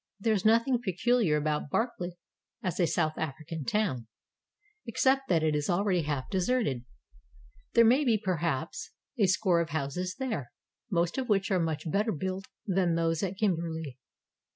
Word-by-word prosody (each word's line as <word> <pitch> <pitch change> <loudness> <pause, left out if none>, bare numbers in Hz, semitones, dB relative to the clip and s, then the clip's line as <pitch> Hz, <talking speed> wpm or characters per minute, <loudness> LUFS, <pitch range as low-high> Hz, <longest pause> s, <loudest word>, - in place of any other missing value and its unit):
There 220 +2 +2
is 200 -3 0
nothing 230 +3 +3
peculiar 210 -4 +2
about 150 -1 -1
Barkly 180 - -2 0.5
as 180 -2 -2
a 175 - +4
South 155 -1 0
African 155 0 -4
town, 140 - 0 0.8
except 265 +3 +2
that 165 -3 +3
it 155 -1 +2
is 150 -1 -1
already 180 0 +2
half 145 -4 -2
deserted. 190 - 0 0.9
There 235 - +6
may 255 +6 +5
be 235 -5 +3
perhaps 165 -6 -2 0.3
a 200 - +5
score 185 -2 +3
of 165 - -3
houses 160 +5 -2
there, 220 - -3 0.4
most 175 +3 0
of 255 -2 -3
which 200 -1 +2
are 185 - +3
much 160 -3 -1
better 210 +5 +1
built 190 +3 -3 0.2
than 185 -4 +1
those 165 -1 +1
at 190 0 -2
Kim 205 -4 +2
berley. 160 -5 -5
180 Hz, 160 wpm, -29 LUFS, 160-215 Hz, 0.9 s, There